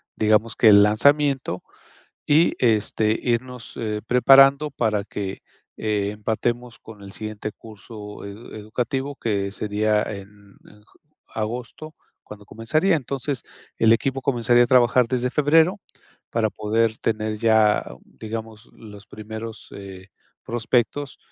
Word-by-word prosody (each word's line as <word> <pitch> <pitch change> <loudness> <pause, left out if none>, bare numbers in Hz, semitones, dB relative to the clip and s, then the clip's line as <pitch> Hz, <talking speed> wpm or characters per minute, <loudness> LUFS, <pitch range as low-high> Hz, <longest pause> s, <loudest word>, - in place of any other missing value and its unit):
digamos 110 +1 +2
que 115 - +4
el 100 -1 +8
lanzamiento. 135 -1 +2 0.6
Y, 155 +3 +4
este, 110 -1 +1
irnos, 125 0 -3
eh, 105 -2 -3
preparando 135 +4 +5
para 110 -6 -1
que, 100 -2 -6 0.3
eh, 105 -2 -1
empatemos 115 +3 -3
con 110 -2 -13
el 100 - -11
siguiente 110 0 -6
curso 105 -1 -11
ed 100 +3 -10
educativo, 125 +6 -3
que 100 -5 -2
sería 105 +1 0
en 100 0 -10
en 105 0 -19
j - - -28 0.4
agosto, 120 +8 -5 0.3
cuando 105 -1 -12
comenzaría. 155 - +1
Entonces, 135 -1 -4 0.4
el 115 0 +5
equipo 135 +3 0
comenzaría 120 -2 +3
a - - -2
trabajar 125 0 +4
desde 125 0 -1
febrero 160 - +3 0.5
para 110 -2 0
poder 110 +1 0
tener 110 -1 -2
ya, 110 -2 +3 0.2
digamos, 110 0 -8
los 105 -2 -13
primeros, 110 +1 -8
eh, 95 -1 -10 0.4
prospectos 120 +4 -1
110 Hz, 125 wpm, -23 LUFS, 105-125 Hz, 0.6 s, el